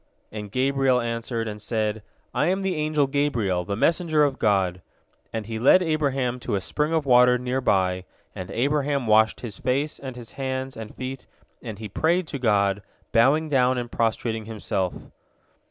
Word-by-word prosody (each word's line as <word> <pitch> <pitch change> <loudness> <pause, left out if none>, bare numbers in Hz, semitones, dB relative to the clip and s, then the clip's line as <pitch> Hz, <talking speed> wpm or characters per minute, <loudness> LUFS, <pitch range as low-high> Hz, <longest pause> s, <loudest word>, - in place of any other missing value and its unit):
And 105 -2 -7
Gabriel 135 +1 +2
answered, 115 -1 -3
and 105 -1 -6
said, 110 0 -1 0.3
"I 150 - +1
am 190 +2 0
the 190 -1 0
angel 155 -2 +1
Gabriel, 120 -10 0
the 100 - -2
messenger 160 - +2
of 140 -2 0
God," 95 -4 +1 0.5
and 110 -2 -4
he 110 +1 -4
led 160 +10 +6
Abraham 135 -6 0
to 110 - -2
a - - +1
spring 150 - -1
of 160 -3 +1
water 125 -1 +6
near 125 +1 -2
by, 95 -5 +1 0.3
and 90 - -7
Abraham 140 +1 0
washed 110 0 +3
his 110 -6 -7
face 140 +4 -1
and 130 -2 -7
his 120 -2 -9
hands 130 -1 -4
and 110 -1 -8
feet, 130 0 -6 0.3
and 110 -4 -7
he 110 0 -6
prayed 170 - +1
to 140 - -4
God, 100 -4 +2 0.3
bowing 140 +7 +4
down 130 -3 +2
and 120 -1 -4
prostrating 115 -1 -1
himself. 100 -4 -2
125 Hz, 170 wpm, -24 LUFS, 110-140 Hz, 0.5 s, led